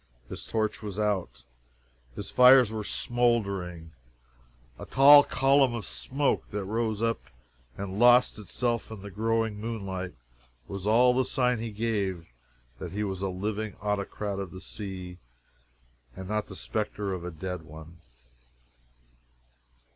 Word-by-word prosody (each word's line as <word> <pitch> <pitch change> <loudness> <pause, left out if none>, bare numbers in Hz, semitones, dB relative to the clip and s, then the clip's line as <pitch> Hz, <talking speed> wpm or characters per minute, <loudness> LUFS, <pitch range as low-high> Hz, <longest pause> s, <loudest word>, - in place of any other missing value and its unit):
His - - -7
torch 110 -1 -1
was 105 -2 -6
out; 95 - -1 0.7
his - - -6
fires 125 -2 +7
were 110 -1 -4
smoldering; 100 -10 -1 0.9
a - - -7
tall 145 +3 +9
column 135 -2 +3
of 115 - -5
smoke 140 +2 -1
that 105 -1 -3
rose 110 +1 -1
up 115 0 0 0.6
and 100 0 -5
lost 120 -1 +5
itself 115 +3 -2
in 110 -3 -9
the 100 - -8
growing 110 +1 -1
moonlight 95 -5 -4 0.5
was 100 0 -5
all 125 +3 +5
the 130 +1 +2
sign 125 -2 +1
he 115 0 -4
gave 100 - -2 0.5
that - - -6
he 105 +1 -2
was 95 -2 -4
a 100 - -1
living 105 +3 -3
Autocrat 105 0 -3
of 95 -2 -4
the 95 - -10
Sea 95 -3 -7 1.0
and 95 - -8
not 105 +1 -2
the - - -9
spectre 105 -2 -3
of 90 -2 -5
a 90 - -4
dead 90 +2 -5
one. 80 +1 -13
105 Hz, 140 wpm, -28 LUFS, 95-115 Hz, 1.0 s, tall